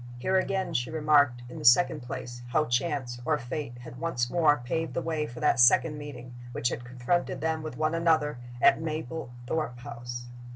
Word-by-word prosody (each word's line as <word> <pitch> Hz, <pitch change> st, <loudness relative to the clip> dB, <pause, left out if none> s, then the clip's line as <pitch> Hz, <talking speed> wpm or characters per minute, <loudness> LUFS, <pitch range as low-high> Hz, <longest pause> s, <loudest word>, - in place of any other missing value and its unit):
Here 185 Hz, +10 st, 0 dB
again 190 Hz, -2 st, 0 dB
she 125 Hz, -4 st, 0 dB
remarked, 145 Hz, -5 st, +3 dB
in 125 Hz, -, -8 dB
the -, -, -8 dB
second 150 Hz, +6 st, +5 dB
place, 120 Hz, 0 st, -7 dB
how 150 Hz, +5 st, +2 dB
Chance, 120 Hz, -2 st, -1 dB
or -, -, +1 dB
Fate, 120 Hz, +1 st, -5 dB
had 125 Hz, 0 st, -10 dB
once 120 Hz, -8 st, -1 dB
more 155 Hz, -4 st, +4 dB
paved 155 Hz, +6 st, -3 dB
the -, -, 0 dB
way 155 Hz, -2 st, -1 dB
for 120 Hz, 0 st, -9 dB
that 120 Hz, -, +3 dB
second 150 Hz, +5 st, +5 dB
meeting 125 Hz, -4 st, -9 dB, 0.2 s
which 120 Hz, -, 0 dB
had 120 Hz, -, -5 dB
confronted 125 Hz, +8 st, -1 dB
them 160 Hz, 0 st, -1 dB
with 155 Hz, -5 st, -6 dB
one 155 Hz, +1 st, +1 dB
another 160 Hz, -5 st, +2 dB, 0.2 s
at 150 Hz, -, +5 dB
Mablethorpe 155 Hz, -3 st, -4 dB
House. 120 Hz, 0 st, -7 dB
145 Hz, 180 wpm, -28 LUFS, 120-160 Hz, 0.2 s, second